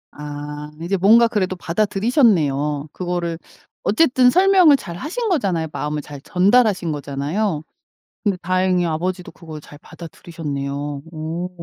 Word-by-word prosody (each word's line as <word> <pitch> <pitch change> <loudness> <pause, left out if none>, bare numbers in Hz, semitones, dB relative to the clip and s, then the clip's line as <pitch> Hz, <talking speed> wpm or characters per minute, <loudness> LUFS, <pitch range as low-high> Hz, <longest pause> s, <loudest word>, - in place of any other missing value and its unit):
아 150 0 -7
이제 175 +4 -1
뭔가 225 +6 +6
그래도 190 -5 -1
받아들이셨네요. 170 - +1
그거를 175 -2 -3 0.4
어쨌든 255 +1 +4
설명을 365 -2 +5
잘 170 -9 -8
하신거잖아요. 280 - -1
마음을 150 0 -3
잘 145 -1 -10
전달하신 190 - +2
거잖아요. 150 +5 -2 0.6
근데 200 -4 0
다행히 185 0 +1
아버지도 175 +3 -3
그걸 155 -3 -10
잘 145 - -14
받아들이셨네요. 145 -4 -6
오. 165 +3 -4
175 Hz, 325 characters per minute, -20 LUFS, 150-210 Hz, 0.6 s, 뭔가